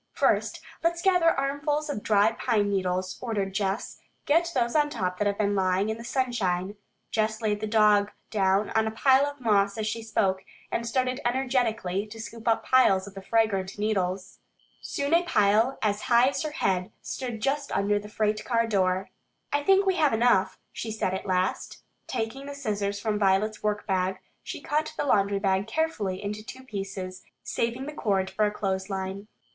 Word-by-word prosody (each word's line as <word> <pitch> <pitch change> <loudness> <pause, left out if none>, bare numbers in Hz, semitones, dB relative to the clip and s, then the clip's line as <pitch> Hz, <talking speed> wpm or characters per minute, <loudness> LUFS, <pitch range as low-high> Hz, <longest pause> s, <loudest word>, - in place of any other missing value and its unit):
"First, - - +1 0.2
let's 335 0 +1
gather 360 -2 +4
armfuls 290 +1 -1
of 285 -8 -3
dry 210 +1 +3
pine 220 -3 0
needles," 185 -1 -1
ordered 205 -5 -2
Jess. 195 +2 -2 0.3
"Get 335 +3 +3
those 240 0 +1
on 295 -1 +3
top 180 -8 -3
that 210 - +2
have 200 0 0
been 205 -1 +1
lying 190 +1 +1
in 220 +1 -3
the - - -7
sunshine." 215 -7 -1 0.4
Jess 215 0 0
laid 210 -2 0
the 215 - -3
dog 210 -2 +4 0.2
down 195 0 +2
on 220 0 +2
a - - +1
bed 260 +4 +4
of 285 0 -6
moss 200 -3 +2
as 220 - -2
she 220 +2 -2
spoke, 200 -4 0 0.3
and 235 - -2
started 255 +1 0
energetically 240 -6 0
to 225 +2 -10
scoop 230 +1 -8
up 225 - +2
piles 220 -7 +4
of 200 - -11
the 195 - -8
fragrant 195 -3 0
needles. 195 -3 -2 0.4
Soon 280 +2 -2
a 340 - +6
pile 220 - +2
as 210 -1 +1
high 240 +2 +4
as 280 - -3
her 310 - -2
head 185 -10 -1
stood 245 -4 -4
just 275 +4 -1
under 205 +1 +1
the 210 0 -10
freight 215 0 0
car 230 -2 +1
door. 190 -3 0 0.4
"I 290 - +2
think 390 +5 +4
we 380 -2 +2
have 300 -6 +3
enough," 225 -4 +3 0.2
she 225 - -5
said 215 -4 -1
at 190 - -4
last. 185 0 -1 0.2
Taking 260 +5 -4
the 285 - -6
scissors 205 -6 -2
from 210 -1 -1
Violet's 200 +2 +2
workbag, 190 -3 0 0.2
she - - -7
cut 305 +1 -1
the - - -1
laundry 200 -5 +2
bag 195 0 +1
carefully 225 -10 -2
into 210 +1 -4
two 260 +4 -10
pieces, 195 -5 -6 0.2
saving 235 +3 -2
the 300 - -6
cord 195 -8 0
for 210 +3 +1
a - - -2
clothesline. 195 0 -3
215 Hz, 185 wpm, -27 LUFS, 195-255 Hz, 0.4 s, a